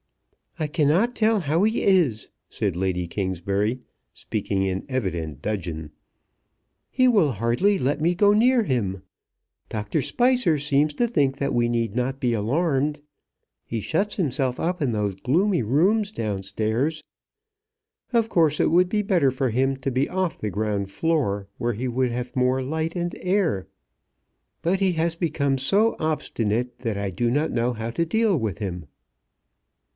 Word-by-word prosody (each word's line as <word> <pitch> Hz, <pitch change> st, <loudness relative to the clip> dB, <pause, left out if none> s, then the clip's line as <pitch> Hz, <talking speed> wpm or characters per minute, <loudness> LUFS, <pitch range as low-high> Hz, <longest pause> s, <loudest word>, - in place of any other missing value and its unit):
"I 155 Hz, -, 0 dB
cannot 165 Hz, -, +2 dB
tell 220 Hz, -1 st, +2 dB
how 160 Hz, +4 st, +1 dB
he 220 Hz, +2 st, +1 dB
is," 165 Hz, -, +2 dB, 0.2 s
said 100 Hz, -5 st, -2 dB
Lady 90 Hz, -1 st, -1 dB
Kingsbury, 100 Hz, +5 st, -1 dB, 0.3 s
speaking 100 Hz, -2 st, -2 dB
in 95 Hz, 0 st, -2 dB
evident 85 Hz, -, -3 dB
dudgeon. 85 Hz, -7 st, -4 dB, 1.0 s
"He 255 Hz, -1 st, +3 dB
will 195 Hz, -, +3 dB
hardly 120 Hz, -, +1 dB
let 140 Hz, +4 st, 0 dB
me 170 Hz, +3 st, +2 dB
go 205 Hz, +3 st, +4 dB
near 240 Hz, +3 st, +4 dB
him. 100 Hz, -, -2 dB, 0.7 s
Doctor 105 Hz, -1 st, -2 dB
Spicer 245 Hz, -10 st, +2 dB
seems 150 Hz, +1 st, +1 dB
to 240 Hz, -, +1 dB
think 140 Hz, -, +1 dB
that 140 Hz, 0 st, -1 dB
we 120 Hz, 0 st, +2 dB
need 115 Hz, -3 st, -1 dB
not 130 Hz, +2 st, -1 dB
be 125 Hz, -3 st, +1 dB
alarmed. 145 Hz, +6 st, 0 dB, 0.6 s
He 115 Hz, -, -4 dB
shuts 195 Hz, -, -1 dB
himself 135 Hz, -7 st, -1 dB
up 175 Hz, 0 st, -1 dB
in 135 Hz, -4 st, +1 dB
those 105 Hz, -3 st, -1 dB
gloomy 170 Hz, -, +1 dB
rooms 195 Hz, -, +2 dB
down 105 Hz, -, -3 dB
stairs. 115 Hz, +10 st, -1 dB, 1.1 s
Of 230 Hz, -2 st, +2 dB
course 160 Hz, -7 st, +2 dB
it -, -, +3 dB
would 180 Hz, +2 st, +4 dB
be 210 Hz, +1 st, 0 dB
better 175 Hz, -10 st, +2 dB
for 130 Hz, -1 st, -1 dB
him 135 Hz, +3 st, +1 dB
to 135 Hz, +1 st, -3 dB
be 130 Hz, +3 st, 0 dB
off 185 Hz, -2 st, -1 dB
the 105 Hz, -, -3 dB
ground 100 Hz, -1 st, -2 dB
floor, 105 Hz, -8 st, 0 dB
where 120 Hz, 0 st, -1 dB
he 120 Hz, +5 st, -3 dB
would 125 Hz, 0 st, 0 dB
have 125 Hz, +3 st, -5 dB
more 130 Hz, +1 st, +2 dB
light 160 Hz, +5 st, -2 dB
and 175 Hz, -1 st, -2 dB
air. 180 Hz, -, 0 dB, 1.0 s
But 185 Hz, +3 st, +1 dB
he 190 Hz, -2 st, +2 dB
has 165 Hz, 0 st, 0 dB
become 155 Hz, -5 st, 0 dB
so 200 Hz, -, +3 dB
obstinate, 125 Hz, -6 st, -1 dB
that 115 Hz, -5 st, -2 dB
I 100 Hz, -1 st, -2 dB
do 120 Hz, +6 st, 0 dB
not 150 Hz, +5 st, +1 dB
know 120 Hz, +1 st, 0 dB
how 115 Hz, 0 st, -4 dB
to 170 Hz, +7 st, 0 dB
deal 220 Hz, +3 st, +2 dB
with 110 Hz, -, -2 dB
him." 90 Hz, -5 st, -5 dB
135 Hz, 160 wpm, -24 LUFS, 110-170 Hz, 1.1 s, go